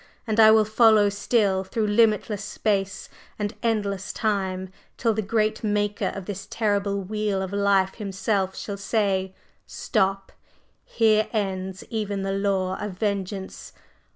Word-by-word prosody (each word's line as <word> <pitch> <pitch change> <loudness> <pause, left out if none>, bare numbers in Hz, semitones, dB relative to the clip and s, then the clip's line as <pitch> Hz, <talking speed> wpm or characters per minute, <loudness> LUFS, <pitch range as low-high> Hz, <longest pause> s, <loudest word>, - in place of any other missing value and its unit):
and 220 -1 -1
I 220 -1 +9
will 220 0 +6
follow 215 -1 +5
still 200 -2 +1
through 215 +3 -2
limitless 210 -1 +2
space 200 -1 -2 0.3
and 205 -1 -2
endless 205 -4 -1
time, 190 -3 -2 0.3
till 230 -2 +1
the 220 - -1
great 215 +1 0
Maker 205 -1 0
of 195 -2 -6
this 200 0 -6
terrible 200 -2 0
wheel 210 0 -1
of 190 +1 -6
life 200 -1 +2
Himself 195 -2 -2
shall 200 -1 -5
say, 195 -2 0 0.3
'Stop! 195 0 -1 0.5
Here 215 -1 +2
ends 190 -3 -3
even 205 -3 -2
the 195 - -1
law 195 -2 0
of 210 -2 -4
vengeance! 195 -1 -4
200 Hz, 135 wpm, -24 LUFS, 195-215 Hz, 0.5 s, I